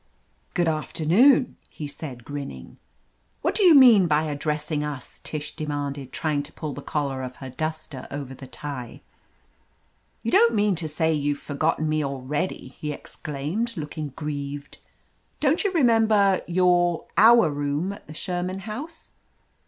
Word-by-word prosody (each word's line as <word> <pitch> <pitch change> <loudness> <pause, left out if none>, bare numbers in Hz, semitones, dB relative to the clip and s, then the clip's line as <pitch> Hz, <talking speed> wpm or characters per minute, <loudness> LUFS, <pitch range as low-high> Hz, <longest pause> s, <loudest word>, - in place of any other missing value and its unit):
"Good 175 - +2
afternoon/' 175 - +3 0.2
he 150 - -7
said, 135 -5 -8
grinning. 145 -1 -7 0.7
"What - - +2
do - - +3
you 355 -5 +8
mean 235 -9 +8
by 155 -1 +3
addressing 150 0 -2
us?" 145 -4 -6
Tish 150 -1 -5
demanded, 145 -3 -4
trying 150 -2 0
to 145 +2 -10
pull 150 -3 -5
the 140 - -7
collar 140 -3 -2
of 130 -1 -6
her 130 -1 -8
duster 155 -2 -4
over 140 -2 -6
the 130 0 -10
tie. 130 -3 -7 1.2
"You 230 - -1
don't 235 -1 +5
mean 205 -1 +3
to 160 -2 -2
say 160 +1 +1
you've 145 -1 0
forgotten 155 +2 -1
me 155 0 +1
already!" 140 +2 -3
he 150 - -3
exclaimed, 155 +11 -4
looking 150 0 -4
grieved. 145 -1 -5 0.6
"Don't 305 +3 +2
you 400 - +1
remember 220 - +4
— - - -18
^your 175 -1 +2
— - - -39
our 225 -7 +7
room 145 +5 -1
at - - -14
the 155 - -10
Sherman 180 +2 -3
House?" 285 +11 -7
155 Hz, 150 wpm, -25 LUFS, 145-190 Hz, 1.2 s, you